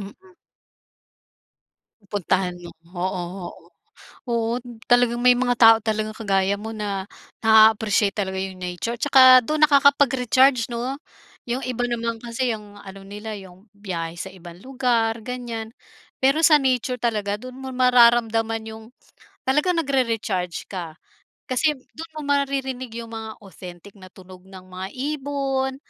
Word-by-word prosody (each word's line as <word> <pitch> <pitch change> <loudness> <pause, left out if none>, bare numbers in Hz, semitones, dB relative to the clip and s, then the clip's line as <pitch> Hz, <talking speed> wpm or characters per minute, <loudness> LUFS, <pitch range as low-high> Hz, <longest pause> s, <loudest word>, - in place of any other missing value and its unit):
Mm. 360 - -12 1.7
Pupuntahan 190 -2 -2
mo, 175 - -9 0.3
oo 185 +1 -2 0.3
oo. - - -12 0.8
Oo, 230 0 0 0.3
talagang 245 -1 +3
may 250 +1 +5
mga 245 0 +1
tao 225 -1 +8
talagang 215 0 -2
kagaya 195 -3 0
mo 215 +2 -7
na 205 -2 -4 0.3
na-aappreciate 220 -2 +4
talaga 190 -2 -3
yung 190 0 -4
nature 180 +6 -4
saka 260 -3 +7
dun 305 +6 -2
nakakapag-recharge 270 -3 +3
no? 240 +3 -3 0.5
Yung 240 +1 -3
iba 245 -1 -3
naman 230 -1 -3
kasi 240 0 -2
yung 205 -1 -12
ano 195 -1 -11
nila 210 +2 -8
yung, 190 0 -13
biyahe 175 -5 -5
sa 180 +2 -7
ibang 175 -2 -13
lugar 245 -4 0
ganyan. 235 -3 -6 0.5
Pero 270 +3 +3
sa 305 -3 +6
nature 250 -1 -1
talaga 210 -4 -1
dun 255 +4 -9
mo 265 -1 -7
mararamdaman 235 -3 +3
yung 220 0 -10 0.6
talagang 330 +5 +2
nagrere-charge 230 - -2
ka. 170 -5 -7 0.5
Kasi 295 +4 0 0.2
dun 325 +1 -10
mo 305 - -6
maririnig 270 -4 -2
yung 230 - -12
mga 220 -1 -7
authentic 185 0 -12
na 185 - -12
tunog 185 0 -15
ng 190 -1 -12
mga 185 +1 -6
ibon, 275 -1 -2
225 Hz, 135 wpm, -22 LUFS, 200-255 Hz, 1.7 s, tao